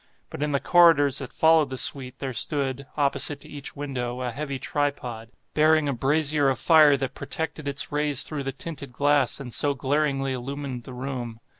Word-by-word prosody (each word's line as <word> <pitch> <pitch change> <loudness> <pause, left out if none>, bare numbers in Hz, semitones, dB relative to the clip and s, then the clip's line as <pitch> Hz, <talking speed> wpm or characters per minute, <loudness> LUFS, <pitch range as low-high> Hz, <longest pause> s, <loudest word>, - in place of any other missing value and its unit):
But - - -7
in 150 0 0
the 140 - +1
corridors 150 -6 +5
that 135 - -7
followed 160 -3 +4
the 130 - -5
suite, 130 -1 -1
there 135 -2 -4
stood, 140 +1 -1
opposite 140 0 +1
to - - -14
each 145 -1 -7
window, 130 -4 -4
a 125 -1 -2
heavy 140 +2 -4
tripod, 130 -5 -3 0.2
bearing 155 0 +3
a 140 - 0
brazier 145 +2 +2
of 130 - 0
fire 150 0 +5
that 135 -1 -4
projected 160 -2 -5
its 140 +1 +1
rays 145 -2 0
through 150 -2 -5
the 135 - -1
tinted 140 -1 -7
glass 145 -1 +2
and 125 -4 -6
so 145 -1 +2
glaringly 135 0 0
illumined 130 -1 -5
the 130 - -9
room. 125 -3 -5
140 Hz, 185 wpm, -25 LUFS, 130-150 Hz, 0.2 s, corridors